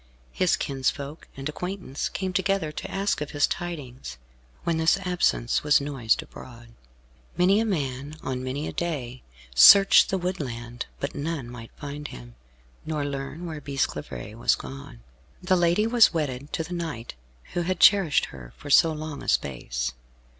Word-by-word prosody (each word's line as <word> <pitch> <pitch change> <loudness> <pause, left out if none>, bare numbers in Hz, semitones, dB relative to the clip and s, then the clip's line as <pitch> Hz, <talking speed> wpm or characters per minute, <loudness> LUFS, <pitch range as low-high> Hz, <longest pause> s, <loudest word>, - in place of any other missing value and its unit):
His 185 -2 +2
kinsfolk 140 +2 -3
and 135 +1 -4
acquaintance 180 -2 -4
came 190 -1 -3
together 190 -4 0
to - - -6
ask 195 -4 -1
of 150 - -3
his 145 - +5
tidings, 130 - -6 0.5
when 170 -1 0
this 160 +4 +3
absence 180 -10 +1
was 150 0 +4
noised 135 -6 0
abroad. 120 -2 -13 0.7
Many 185 +4 +4
a 225 - +1
man, 145 - -3
on 130 -1 -3
many 135 +4 -3
a - - -5
day, 130 -8 -3 0.3
searched 195 - +8
the 190 - +1
woodland, 125 -10 -4
but 140 - -3
none 145 -3 -3
might 115 -2 -9
find 145 0 -6
him, - - -11 0.5
nor 155 -2 -2
learn 140 +4 -5
where 160 -3 -6
Bisclavaret 110 - -4
was - - +3
gone. 135 -3 -10 0.4
The 185 0 +2
lady 175 +4 +3
was 230 0 +6
wedded 145 -4 -3
to 160 - -1
the 170 +3 -7
knight 160 -9 -5 0.4
who 175 - 0
had 180 0 -1
cherished 195 -8 +5
her 60 -3 -11
for 145 - -7
so 165 +3 +6
long 155 -1 -6
a - - -9
space. 60 -2 -1
145 Hz, 160 wpm, -26 LUFS, 130-175 Hz, 0.7 s, searched